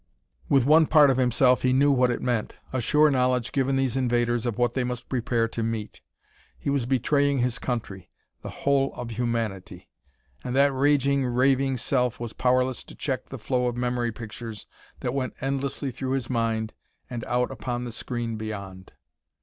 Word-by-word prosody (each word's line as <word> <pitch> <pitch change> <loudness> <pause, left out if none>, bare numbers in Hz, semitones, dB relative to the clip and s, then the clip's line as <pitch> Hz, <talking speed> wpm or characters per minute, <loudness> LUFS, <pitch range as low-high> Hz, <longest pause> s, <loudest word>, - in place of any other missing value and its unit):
With 135 -3 +4
one 155 +2 +6
part 150 -3 +6
of 130 - 0
himself 125 0 +3
he 130 0 +2
knew 140 +2 +4
what 125 -2 +3
it 120 - -2
meant: 120 -4 -1 0.2
a 130 - 0
sure 150 +5 +4
knowledge 125 -2 +1
given 135 0 +1
these 135 -2 0
invaders 120 -2 +1
of 120 - -2
what 120 -1 +1
they 130 - 0
must 125 0 -5
prepare 120 -2 0
to 115 - -4
meet; 110 -2 -4 0.6
he 140 - -2
was 135 -4 0
betraying 140 +2 +2
his 125 -1 0
country; 110 -7 -4 0.3
the - - -7
whole 140 -1 +1
of 120 -1 -6
humanity! 115 -4 -3 0.5
And 125 0 -3
that 140 0 +4
raging, 140 0 +2
raving 130 +2 +2
self 125 0 0
was 120 -2 -5
powerless 130 0 +1
to - - -12
check 130 -3 -3
the 135 - -6
flow 125 +2 0
of 120 0 -3
memory 120 -1 -1
pictures 110 -1 -8 0.4
that 125 - -2
went 130 -2 -2
endlessly 135 0 -2
through 130 +2 -3
his 130 -2 -2
mind 115 -2 -1 0.3
and 120 -3 -5
out 125 +2 0
upon 120 0 -4
the 120 - -5
screen 115 -1 -4
beyond.... 100 -4 -7
125 Hz, 180 wpm, -26 LUFS, 115-135 Hz, 0.6 s, one